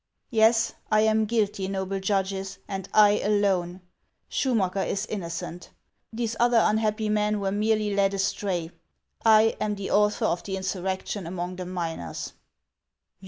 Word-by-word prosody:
Yes, 225 0 +4 0.2
I 215 0 +5
am 220 0 +3
guilty, 205 -4 0
noble 195 0 -2
judges, 195 0 -1
and 195 -1 -5
I 210 -1 +5
alone. 190 -3 0 0.5
Schumacker 200 -7 +1
is 195 - -2
innocent; 175 -2 -6 0.4
these 230 0 -3
other 240 -1 +4
unhappy 215 0 +1
men 210 0 +1
were 195 -1 -1
merely 210 0 +1
led 200 0 +2
astray. 190 -4 -1 0.5
I 220 0 +5
am 210 -1 0
the 200 -1 -5
author 210 0 +2
of 175 - 0
the 190 -1 -4
insurrection 190 0 -3
among 180 +1 -4
the 180 -1 -5
miners." 165 - -5
200 Hz, 135 wpm, -26 LUFS, 190-215 Hz, 0.5 s, I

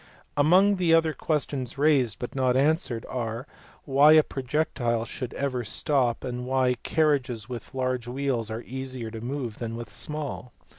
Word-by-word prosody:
Among 180 +8 +5 0.2
other 165 -1 +4
questions 140 -4 -2
raised, 135 -7 +3
but 125 +1 -6
not 130 -2 +2
answered, 140 -5 +1
are 115 0 -4 0.4
why 145 +2 +6
a 155 -1 +7
projectile 130 -4 -1
should 125 0 -5
ever 130 -3 -1
stop, 125 +1 0
and 125 -1 -4
why 130 -1 +2
carriages 135 -8 +1
with 125 0 -8
large 130 -2 -1
wheels 125 -3 -1
are 110 +2 -5
easier 130 -3 -6
to 110 -1 -7
move 125 -2 -4
than 115 -1 -4
those - - -5
with 120 -2 -7
small. 145 0 -5
130 Hz, 155 wpm, -26 LUFS, 120-145 Hz, 0.4 s, a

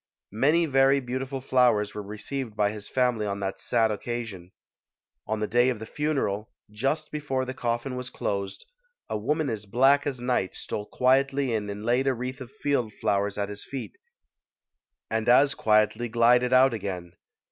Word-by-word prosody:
Many 150 +9 +3
very 135 -1 +4
beautiful 130 +1 -4
flowers 125 -6 +2
were 105 - -5
re 105 +1 -8
ceived 130 0 -4
by 105 -1 +2
his 105 -1 -8
family 125 -5 +1
on 100 0 -3
that 95 0 -3
sad 115 -2 +2
occasion. 105 -5 -5 0.8
On 110 0 -1
the - - +1
day 120 +3 +3
of 125 - -1
the 110 - -7
funeral, 115 -8 -2 0.2
just 135 +8 -2
before 140 -4 -2
the 130 - -5
coffin 120 +1 -2
was 125 0 -5
closed, 100 -1 -4 0.5
a - - 0
woman 150 +7 0
as 110 -4 -4
black 135 +7 +4
as 135 -3 -3
night 120 -6 -1
stole 105 0 -5
quietly 135 0 +2
in 105 -2 -2
and 105 +1 -6
laid 125 +3 +2
a 135 - +2
wreath 130 +3 -5
of 125 - -8
field 140 -6 -1
flowers 100 0 0
at 100 -1 -2
his 100 0 -7
feet 135 - -7 1.2
and 110 0 0
as 135 +3 +6
quietly 110 +2 +2
glided 120 +2 +4
out 130 0 +6
again. 90 -5 -5
120 Hz, 175 wpm, -26 LUFS, 105-135 Hz, 1.2 s, as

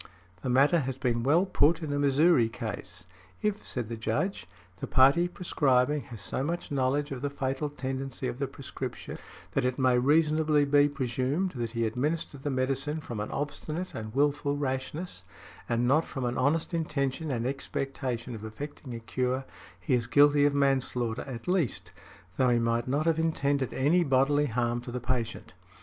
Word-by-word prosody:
The 130 - -3
matter 140 +7 +4
has 135 -2 -3
been 120 -3 0
well 155 +9 +3
put 165 -2 +3
in 145 -2 -2
a 145 - 0
Missouri 140 -3 +4
case. 100 -6 -6 0.4
"If," 210 0 0
said 120 -3 -3
the 115 - -4
Judge, 115 - -2 0.3
"the - - -5
party 140 +7 +5
prescribing 145 -6 +1
has 115 -5 -9
so 130 - -2
much 170 +2 -3
knowledge 140 +2 0
of 130 -2 -4
the 145 - -1
fatal 140 +1 -2
tendency 135 -2 -4
of 125 +1 -5
the 140 - 0
prescription 135 -1 -7 0.3
that 135 - 0
it 125 0 0
may 130 -2 +3
reasonably 150 +1 +3
be 145 +1 +4
presumed 140 +6 -1
that 120 -5 -4
he 115 -1 0
administered 140 +5 -2
the 145 - -2
medicine 135 +3 -1
from 120 -7 -6
an 105 - -3
obstinate 155 +4 -4
and 110 +1 -6
wilful 145 0 +1
rashness, 145 +5 -3 0.5
and 120 +1 +1
not 150 +5 +4
from 135 -5 -4
an 120 0 -1
honest 150 +7 +1
intention 155 -2 -1
and 120 -3 -1
expectation 130 -2 -3
of 110 -2 -8
effecting 125 +3 -7
a - - -5
cure, 125 +3 -2 0.3
he 95 - -1
is 120 -2 +1
guilty 145 0 +5
of 145 -1 +2
manslaughter 130 -4 +1
at 120 -3 -7
least, 120 - 0 0.5
though 130 -1 +4
he 120 - +4
might 115 0 0
not 145 +4 0
have 165 -1 +2
intended 140 -5 0
any 155 +7 +3
bodily 145 +1 +3
harm 120 0 0
to 125 0 -8
the 125 - -3
patient". 120 -2 -3
135 Hz, 175 wpm, -29 LUFS, 125-145 Hz, 0.5 s, party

